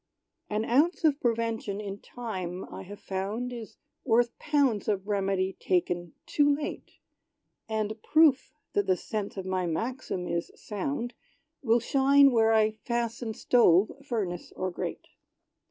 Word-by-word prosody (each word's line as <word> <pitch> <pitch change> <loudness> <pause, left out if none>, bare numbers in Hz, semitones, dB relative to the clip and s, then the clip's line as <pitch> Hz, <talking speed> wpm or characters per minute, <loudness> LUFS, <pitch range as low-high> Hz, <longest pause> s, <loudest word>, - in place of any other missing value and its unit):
An 215 +1 -1
ounce 305 +10 +2
of 300 -3 +3
prevention 230 -4 -1
in 200 -1 -5
time, 185 -8 -5
I - - -6
have 205 +2 -10
found, 210 +7 -3
Is 230 -3 -8 0.3
worth 235 -1 +2
pounds 280 -9 +1
of 200 -2 -1
remedy 195 -2 0
taken 175 -2 0
too 290 -1 +3
late! 290 - -6 0.7
And 220 0 -2
proof 310 -4 +4 0.2
that 405 -1 +1
the 185 - +3
sense 205 0 -4
of 190 - -4
my 185 -1 -1
maxim 205 +1 -3
is 170 0 -2
sound, 210 - -4 0.5
Will 235 -2 +3
shine 275 +3 +5
where 225 -2 +4
I 220 -1 +4
fasten 235 -1 -2
stove, 205 -5 +4
furnace 205 -10 -3
or 185 0 -2
grate. - - -5
220 Hz, 140 wpm, -28 LUFS, 190-245 Hz, 0.7 s, shine